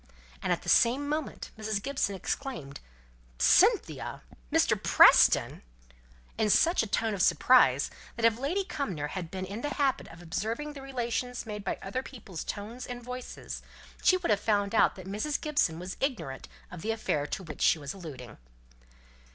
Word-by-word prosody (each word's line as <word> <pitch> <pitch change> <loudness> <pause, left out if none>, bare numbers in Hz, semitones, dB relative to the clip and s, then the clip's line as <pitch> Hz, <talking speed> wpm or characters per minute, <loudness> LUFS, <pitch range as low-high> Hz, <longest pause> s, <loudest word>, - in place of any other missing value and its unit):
And - - -1
at - - 0
the - - -12
same 255 +5 +4
moment 305 0 -4
Mrs. 215 -1 -1
Gibson 260 -4 -1
exclaimed, 190 - -5 0.6
"Cynthia - - +3 0.3
Mr. - - +3
Preston!" - - +6 0.8
in 215 - +2
such 335 - +4
a 225 - -2
tone 220 +2 0
of 195 - -2
surprise, 160 - +4 0.2
that 230 - 0
if 230 0 +3
Lady 340 +9 0
Cumnor 195 - -4
had 175 -2 -5
been 185 +1 -5
in 200 +4 -6
the 290 +2 -3
habit 275 -3 0
of 165 - -13
observing 225 - -3
the 280 - -9
revelations 250 -2 -3
made 210 -2 -6
by 195 - -2
other 200 +7 -3
people's 210 - -8
tones 220 +5 -6
and 245 -1 -7
voices, 250 +1 -7 0.4
she 370 - +5
would 360 -10 -1
have 205 - +3
found 205 -1 0
out 225 - +4
that 185 - -10
Mrs. 215 +10 -2
Gibson 290 - 0
was 180 +2 -6
ignorant 230 - -3 0.2
of 180 -2 -8
the 220 - -4
affair 185 -10 -1
to 190 - -4
which 160 -3 -9
she - - +5
was 140 -2 -6
alluding. 145 - -10
220 Hz, 170 wpm, -29 LUFS, 185-265 Hz, 0.8 s, Preston